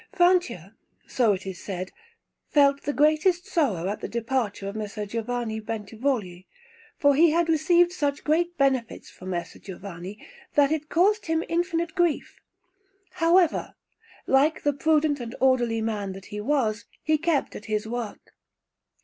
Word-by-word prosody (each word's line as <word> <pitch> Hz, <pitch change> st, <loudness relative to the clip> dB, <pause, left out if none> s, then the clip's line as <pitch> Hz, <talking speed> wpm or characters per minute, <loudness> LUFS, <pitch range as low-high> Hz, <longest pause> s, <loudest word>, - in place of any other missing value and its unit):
Francia, 350 Hz, -, +2 dB, 0.3 s
so 235 Hz, -4 st, +2 dB
it 190 Hz, -1 st, -3 dB
is 190 Hz, -2 st, -6 dB
said, 185 Hz, -1 st, -5 dB, 0.6 s
felt 280 Hz, -1 st, +4 dB
the 290 Hz, -, -2 dB
greatest 310 Hz, +5 st, +2 dB
sorrow 210 Hz, -, 0 dB
at 205 Hz, +2 st, -3 dB
the -, -, -3 dB
departure 230 Hz, -4 st, -2 dB
of 200 Hz, -, -5 dB
Messer 210 Hz, 0 st, -4 dB
Giovanni 230 Hz, +1 st, -3 dB
Bentivogli, 215 Hz, -3 st, -3 dB, 0.5 s
for 285 Hz, -3 st, +4 dB
he 325 Hz, +4 st, +5 dB
had 335 Hz, +2 st, +2 dB
received 340 Hz, +2 st, +3 dB
such 290 Hz, -5 st, -2 dB
great 340 Hz, +3 st, +1 dB
benefits 265 Hz, -4 st, 0 dB
from 185 Hz, -, -10 dB
Messer 175 Hz, -2 st, -4 dB
Giovanni, 190 Hz, 0 st, -8 dB, 0.4 s
that 290 Hz, 0 st, +4 dB
it 310 Hz, -1 st, -2 dB
caused 405 Hz, +5 st, +2 dB
him 325 Hz, 0 st, +1 dB
infinite 340 Hz, -1 st, -1 dB
grief; 345 Hz, -4 st, 0 dB, 0.7 s
however, 340 Hz, 0 st, +2 dB, 0.5 s
like 285 Hz, +4 st, +2 dB
the 290 Hz, -, +2 dB
prudent 305 Hz, 0 st, +2 dB
and 235 Hz, 0 st, -6 dB
orderly 240 Hz, -4 st, +2 dB
man 205 Hz, -3 st, -2 dB
that 190 Hz, 0 st, -11 dB
he 210 Hz, 0 st, -6 dB
was, 230 Hz, -4 st, 0 dB, 0.2 s
he 310 Hz, 0 st, +2 dB
kept 325 Hz, -3 st, 0 dB
at 210 Hz, -, -8 dB
his 215 Hz, 0 st, -1 dB
work. 235 Hz, -2 st, -6 dB
265 Hz, 150 wpm, -25 LUFS, 210-315 Hz, 0.7 s, he